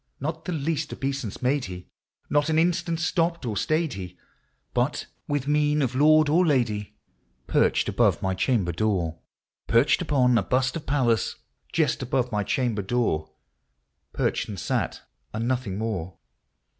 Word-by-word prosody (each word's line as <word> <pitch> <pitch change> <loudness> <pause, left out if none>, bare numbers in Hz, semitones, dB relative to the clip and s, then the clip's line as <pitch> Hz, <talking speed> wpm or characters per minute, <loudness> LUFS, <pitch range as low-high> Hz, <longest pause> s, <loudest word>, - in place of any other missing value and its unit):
Not 160 +4 -4
the - - -3
least 155 -1 -2
obeisance 135 -5 -4
made 135 +2 +1
he; 90 -1 -8 0.4
not 145 +1 +2
an 155 - +2
instant 170 0 +1
stopped 170 -2 0
or 110 -3 -2
stayed 155 +5 0
he; 90 -2 -7 0.6
But, - - 0 0.2
with 145 -2 -1
mien 150 0 +2
of 125 -2 -1
lord 155 +3 +5
or 165 +5 +4
lady, 120 - 0 0.5
perched - - +2
above - - +2
my 95 0 -1
chamber 95 -2 +1
door, 85 -4 -1 0.2
— - - -64
Perched 115 +9 +4
upon 130 -7 +3
a - - +1
bust 130 +5 0
of 165 - -6
Pallas, 125 -6 +1 0.4
just 155 -6 +1
above 125 -1 0
my 105 -1 0
cham 125 +2 0
ber 105 - -2
door,— 95 -7 0 0.8
Perched, - - -1
and 100 -3 -5
sat, - - -2 0.3
and 115 +2 -1
nothing 125 -7 -1
more. 95 -6 -3
130 Hz, 155 wpm, -25 LUFS, 105-150 Hz, 0.8 s, lord